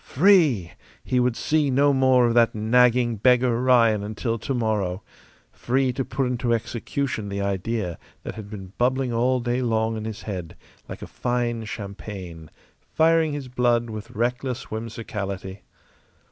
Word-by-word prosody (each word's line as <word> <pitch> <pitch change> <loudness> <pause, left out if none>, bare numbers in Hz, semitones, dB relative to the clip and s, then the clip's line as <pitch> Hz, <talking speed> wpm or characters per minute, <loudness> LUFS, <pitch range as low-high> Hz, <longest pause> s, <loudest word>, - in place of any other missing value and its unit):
Free! 145 - +3 0.3
He 125 - 0
would 125 -1 +1
see 150 +1 +1
no 140 +2 +3
more 130 -2 +4
of 120 - +2
that 115 -1 +3
nagging 120 +1 +3
beggar 125 +1 +3
Ryan 115 -5 +4
until 110 +2 -3
tomorrow. 105 -7 -1 0.5
Free 130 +1 0
to 135 - -2
put 130 +1 -2
into 125 -1 0
execution 115 -1 -3
the 100 0 -3
idea 100 -1 -2 0.2
that - - -5
had 105 -2 -9
been 95 -3 -9
bubbling 130 0 +1
all 125 +2 +2
day 120 +1 -1
long 115 -2 0
in 110 - -5
his 110 0 -6
head, 90 -6 -6 0.3
like - - -7
a - - -4
fine 120 -2 -2
champagne, 100 -6 -8 0.5
firing 160 -1 +3
his 145 -3 -5
blood 120 -2 +1
with 110 0 -7
reckless 125 +3 -3
whimsicality. 100 -4 -5
120 Hz, 145 wpm, -24 LUFS, 105-125 Hz, 0.5 s, more